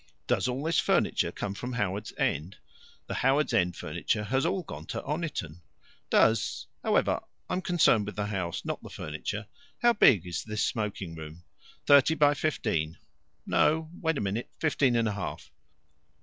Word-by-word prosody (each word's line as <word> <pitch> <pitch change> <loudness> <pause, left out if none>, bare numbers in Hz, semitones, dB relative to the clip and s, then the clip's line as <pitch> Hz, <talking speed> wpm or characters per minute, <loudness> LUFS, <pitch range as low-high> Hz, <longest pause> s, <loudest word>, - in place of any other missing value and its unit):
"Does - - +1
all 130 +3 -2
this 160 +1 +2
furniture - - +2
come 100 - -4
from 125 +5 -5
Howards 100 -4 -2
End?" 85 +6 -1 0.5
"The - - -5
Howards 135 +4 +2
End 90 -1 +2
furniture 105 - -2
has 130 +8 +1
all 185 +1 -1
gone - - -9
to - - -3
Oniton." 145 - -4 0.5
"Does 100 - +3 0.2
However, - - +2 0.3
I'm 185 - -1
concerned 170 - +3
with 105 - -6
the 105 - -1
house, 95 -5 -3
not - - -3
the - - -10
furniture. 90 +8 -5 0.4
How 240 0 +6
big 105 - +5
is 90 -1 -3
this 105 -1 -2
smoking 105 -6 -3
room?" 80 +1 -9 0.4
"Thirty 145 +3 +6
by 145 -1 +5
fifteen. 105 - -1 0.5
No, 160 +1 +2
wait 160 -2 +1
a - - -1
minute. 105 +4 -2
Fifteen 145 -5 +2
and 115 -1 +2
a - - 0
half?." 100 -3 -6
110 Hz, 165 wpm, -29 LUFS, 95-145 Hz, 0.5 s, How